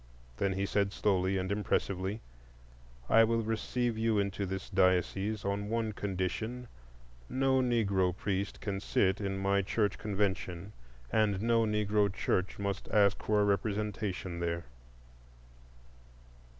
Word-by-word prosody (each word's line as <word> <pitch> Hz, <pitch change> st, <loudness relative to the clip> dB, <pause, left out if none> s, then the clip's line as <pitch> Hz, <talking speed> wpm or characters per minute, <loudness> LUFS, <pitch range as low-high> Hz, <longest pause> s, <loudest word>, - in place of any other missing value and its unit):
Then 95 Hz, +8 st, +1 dB
he 95 Hz, +1 st, -1 dB
said, 100 Hz, 0 st, +1 dB
slowly 95 Hz, -1 st, +1 dB
and 95 Hz, +1 st, -2 dB
impressively: 100 Hz, 0 st, -1 dB, 0.9 s
"I 115 Hz, -, +6 dB
will 115 Hz, 0 st, +1 dB
receive 115 Hz, +1 st, -1 dB
you 110 Hz, -1 st, +2 dB
into 100 Hz, 0 st, -1 dB
this 95 Hz, 0 st, -4 dB
diocese 95 Hz, +3 st, +1 dB
on 100 Hz, +1 st, -2 dB
one 115 Hz, -1 st, 0 dB
condition: 105 Hz, +6 st, -3 dB, 0.6 s
no 130 Hz, 0 st, +2 dB
Negro 100 Hz, -7 st, +1 dB
priest 100 Hz, 0 st, -2 dB
can 100 Hz, -2 st, -2 dB
sit 95 Hz, 0 st, +1 dB
in 100 Hz, -1 st, -2 dB
my 100 Hz, 0 st, +2 dB
church 105 Hz, +2 st, 0 dB
convention, 100 Hz, -2 st, -2 dB, 0.4 s
and 105 Hz, -3 st, +2 dB
no 115 Hz, -1 st, +3 dB
Negro 105 Hz, -1 st, +1 dB
church 95 Hz, -1 st, -1 dB
must 100 Hz, -1 st, -3 dB
ask 100 Hz, -2 st, +3 dB
for 105 Hz, -1 st, +2 dB
representation 100 Hz, -3 st, -1 dB
there." 85 Hz, -2 st, -2 dB
100 Hz, 125 wpm, -31 LUFS, 95-110 Hz, 0.9 s, I